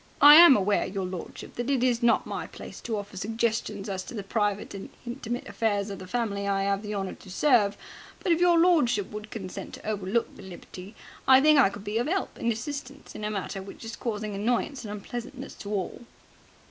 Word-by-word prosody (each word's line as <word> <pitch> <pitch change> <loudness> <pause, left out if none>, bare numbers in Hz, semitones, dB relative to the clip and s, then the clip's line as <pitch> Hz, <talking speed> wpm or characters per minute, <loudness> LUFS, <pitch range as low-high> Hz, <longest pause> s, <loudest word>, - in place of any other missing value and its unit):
"I 290 +1 +10
am 335 -6 +10
aware, 200 +1 +1
your 190 0 -3
lordship, 180 -2 -7
that 240 +2 -2
it 265 -3 +2
is 245 -1 +2
not 235 -1 +3
my - - -4
place - - -10
to 225 -2 -3
offer 205 -1 -7
suggestions 220 -1 -2
as 190 -2 -3
to - - -8
the 205 - -4
private 205 0 -1
and 195 -1 -7 0.2
intimate 240 0 -5
affairs 205 -1 -1
of 195 - -6
the 185 - -9
family 200 -3 -2
I 195 0 +1
'ave 200 0 0
the 210 -1 -5
honour 195 -1 -3
to 190 - -14
serve, 205 -2 +3 0.4
but, 355 - 0
if 335 - +3
your 350 -1 +5
lordship 300 - +3
would 210 0 -7
consent 190 -5 -7
to - - -14
overlook 210 +2 -1
the - - -12
liberty, 190 +2 -10 0.3
I 260 0 +8
think 305 +1 +6
I 255 - +6
could 200 0 -9
be 210 +2 -1
of 240 - -1
'elp 380 +4 -1
and 235 - +1
assistance 275 +4 -6
in - - -8
a 210 - -1
matter 195 -1 -4
which 195 +3 -10
is 225 +1 -6
causing 215 -3 -4
annoyance 240 +6 -1
and 210 - -6
unpleasantness 240 +5 -7
to 200 - -8
all." 195 +1 -3
215 Hz, 215 wpm, -27 LUFS, 200-245 Hz, 0.4 s, I